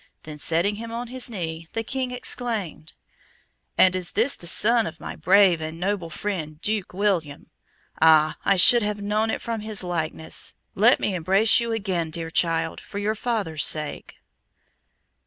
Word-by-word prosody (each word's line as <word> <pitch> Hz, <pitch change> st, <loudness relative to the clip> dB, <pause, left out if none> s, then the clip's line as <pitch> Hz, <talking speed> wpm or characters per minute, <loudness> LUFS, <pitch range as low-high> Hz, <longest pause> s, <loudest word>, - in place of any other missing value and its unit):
Then 150 Hz, -1 st, -9 dB
setting 170 Hz, +8 st, +1 dB
him 230 Hz, +1 st, -7 dB
on 235 Hz, +1 st, -5 dB
his 255 Hz, 0 st, -6 dB
knee, 165 Hz, -6 st, -5 dB
the 225 Hz, -, -2 dB
King 255 Hz, +2 st, -3 dB
exclaimed, 230 Hz, -9 st, -3 dB, 0.8 s
"And 185 Hz, 0 st, +5 dB
is 180 Hz, -2 st, -3 dB
this 240 Hz, +7 st, +2 dB
the 170 Hz, -, -9 dB
son 230 Hz, +5 st, +3 dB
of 165 Hz, +1 st, -9 dB
my -, -, -7 dB
brave 185 Hz, -3 st, +4 dB
and 160 Hz, +1 st, -6 dB
noble 185 Hz, -2 st, -2 dB
friend, 160 Hz, -4 st, -5 dB
Duke 210 Hz, 0 st, -2 dB
William? 180 Hz, -7 st, -2 dB, 0.5 s
Ah! 155 Hz, -1 st, +5 dB
I 195 Hz, -, +3 dB
should 235 Hz, +6 st, +8 dB
have 210 Hz, -1 st, -2 dB
known 210 Hz, +2 st, -1 dB
it -, -, -3 dB
from 230 Hz, -2 st, -4 dB
his 215 Hz, -2 st, -1 dB
likeness. 160 Hz, -2 st, -4 dB, 0.2 s
Let 230 Hz, +6 st, +4 dB
me 205 Hz, -, -1 dB
embrace 195 Hz, +8 st, +3 dB
you 235 Hz, -1 st, -3 dB
again, 190 Hz, -7 st, -2 dB
dear 165 Hz, +1 st, -6 dB
child, 165 Hz, -1 st, 0 dB
for -, -, -10 dB
your 205 Hz, +1 st, -1 dB
father's 210 Hz, -9 st, -2 dB
sake." 150 Hz, -1 st, 0 dB
195 Hz, 165 wpm, -23 LUFS, 165-220 Hz, 0.8 s, should